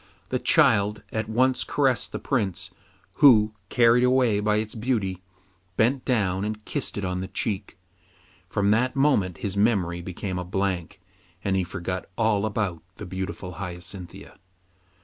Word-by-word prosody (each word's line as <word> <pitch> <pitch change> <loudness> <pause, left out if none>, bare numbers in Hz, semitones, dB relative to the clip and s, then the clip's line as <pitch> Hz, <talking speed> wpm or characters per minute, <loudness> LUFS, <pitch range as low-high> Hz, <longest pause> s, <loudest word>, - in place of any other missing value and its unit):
The - - 0
child 105 +1 +3
at 110 0 -3
once 130 +3 +2
caressed 135 -4 0
the - - -3
Prince, 105 -10 -2 0.5
who, 110 -7 +7 0.2
carried 120 0 +4
away 125 -4 +3
by 105 0 +1
its 110 0 -2
beauty, 110 -6 -1 0.6
bent 125 +4 +2
down 100 -7 +1
and 105 0 -4
kissed - - -3
it 100 - -2
on 90 0 -2
the 95 - -4
cheek. 100 -1 -3 0.7
From 100 +1 +1
that 125 +4 +2
moment 135 - +2
his 100 -1 -4
memory 100 -5 +1
became 90 +1 -4
a - - -3
blank, 95 -2 -2 0.4
and 95 -1 +1
he 95 - +1
forgot 90 +1 -5
all 110 -2 +2
about 100 -6 -2
the - - -8
beautiful 95 0 -5
Hyacinthia. 90 -1 -8
105 Hz, 150 wpm, -25 LUFS, 95-115 Hz, 0.7 s, who